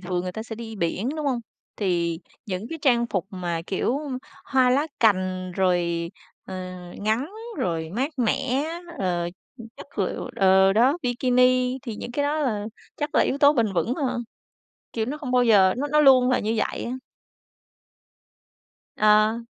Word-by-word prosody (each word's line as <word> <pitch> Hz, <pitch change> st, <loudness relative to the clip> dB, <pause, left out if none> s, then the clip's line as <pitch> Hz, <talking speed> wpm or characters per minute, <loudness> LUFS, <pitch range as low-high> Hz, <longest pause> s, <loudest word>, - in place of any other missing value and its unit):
thường 180 Hz, -1 st, -2 dB
người 180 Hz, 0 st, -4 dB
ta 220 Hz, -, -5 dB
sẽ 225 Hz, 0 st, -7 dB
đi 225 Hz, -1 st, -7 dB
biển, 190 Hz, +5 st, -1 dB
đúng 305 Hz, -2 st, -3 dB
hông? 260 Hz, -3 st, +1 dB, 0.4 s
Thì 170 Hz, -4 st, 0 dB, 0.3 s
những 195 Hz, +2 st, -4 dB
cái 325 Hz, -, -6 dB
trang 240 Hz, -4 st, +3 dB
phục 190 Hz, -5 st, -2 dB
mà, 175 Hz, -4 st, -3 dB
kiểu, 235 Hz, +7 st, 0 dB, 0.5 s
hoa 260 Hz, -2 st, +3 dB
lá 280 Hz, +4 st, +2 dB
cành, 185 Hz, -4 st, +1 dB
rồi, 175 Hz, -2 st, 0 dB, 0.3 s
ờ, 190 Hz, -, -8 dB, 0.4 s
ngắn, 220 Hz, -, -1 dB, 0.3 s
rồi 160 Hz, -2 st, -2 dB
mát 260 Hz, -, -2 dB
mẻ, 255 Hz, +3 st, +1 dB, 0.3 s
ờ, 175 Hz, -2 st, -1 dB, 0.5 s
chất 280 Hz, -, -13 dB
lượng 190 Hz, -, -2 dB
ờ, 190 Hz, 0 st, +5 dB
đó, 255 Hz, -, +3 dB
bikini 250 Hz, +1 st, +2 dB
thì 230 Hz, -4 st, -6 dB
những 240 Hz, -, -7 dB
cái 285 Hz, -, 0 dB
đó 290 Hz, +2 st, 0 dB
là 220 Hz, -8 st, -1 dB, 0.3 s
chắc 295 Hz, +1 st, -4 dB
là -, -, +5 dB
yếu 275 Hz, -, -1 dB
tố 285 Hz, 0 st, +6 dB
bền 230 Hz, -8 st, +1 dB
vững 225 Hz, +7 st, 0 dB
hơn, 255 Hz, -5 st, -2 dB, 0.7 s
kiểu, 220 Hz, -1 st, -1 dB
nó 285 Hz, -, -3 dB
không 280 Hz, -4 st, -5 dB
bao 250 Hz, -1 st, +4 dB
giờ 195 Hz, -5 st, +5 dB
nó 280 Hz, +4 st, -1 dB
nó 300 Hz, +1 st, +3 dB
luôn 260 Hz, -3 st, +6 dB
là 255 Hz, -, +3 dB
như 220 Hz, +2 st, -1 dB
vậy -, -, -2 dB
á. -, -, -4 dB, 2.1 s
Ờ, 215 Hz, +1 st, +4 dB
225 Hz, 170 wpm, -24 LUFS, 185-255 Hz, 2.1 s, tố